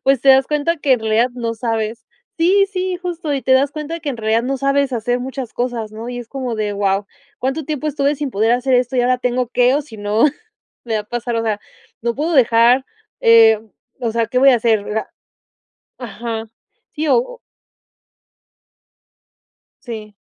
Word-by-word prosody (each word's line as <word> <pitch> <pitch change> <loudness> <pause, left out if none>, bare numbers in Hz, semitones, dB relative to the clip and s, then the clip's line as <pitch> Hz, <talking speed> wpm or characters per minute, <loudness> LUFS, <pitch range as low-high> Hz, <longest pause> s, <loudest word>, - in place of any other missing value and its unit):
pues 270 -2 +3
te 275 - +1
das 265 0 +6
cuenta 300 +3 0
que 285 -3 +1
en 245 - +2
realidad 220 +3 +2
no 230 -2 -3
sabes. 225 0 -3 0.3
Sí, 390 +4 +4
sí 370 -1 -2
justo 345 -4 -4
y 275 - -1
te 260 - +2
das 275 +2 +3
cuenta 310 +2 -5
que 300 -3 -4
en 245 - -5
realidad 220 +1 +1
no 270 +1 -2
sabes 275 0 +1
hacer 245 +1 -1
muchas 260 -2 -6
cosas, 240 -3 -3
¿no? 225 +2 -8
Y 245 0 -5
es 240 - -8
como 255 -3 -4
de: 210 -1 -2
Wao, 200 0 0 0.3
¿cuánto 270 +4 -2
tiempo 305 0 -3
estuve 285 0 0
sin 285 -2 -4
poder 220 +2 +2
hacer 250 +1 +1
esto? 250 +1 +1
Y - - +4
ahora 250 +1 +2
tengo 250 -1 -1
qué. 250 +1 +3
O 295 - +1
si 230 -6 -13
no 205 +3 +1 0.6
me 225 - -3
va - - +1
a - - -19
pasar, 240 +2 -4
o 230 - 0
sea, 215 -2 -1 0.4
no 235 0 -1
puedo 315 +4 -1
dejar, 245 0 +4 0.4
eh, 225 -1 +6 0.4
o 235 -3 -1
sea, 230 0 0
¿qué 250 +3 -2
voy 270 +1 +7
a 250 - +5
hacer, 220 -3 +1
o - - -4
sea?" 220 - -2 0.9
Ajá. 230 -1 -5 0.5
Sí, 310 +1 -2
o - - +1 2.5
Sí. 215 -3 -7
245 Hz, 195 wpm, -18 LUFS, 225-275 Hz, 2.5 s, voy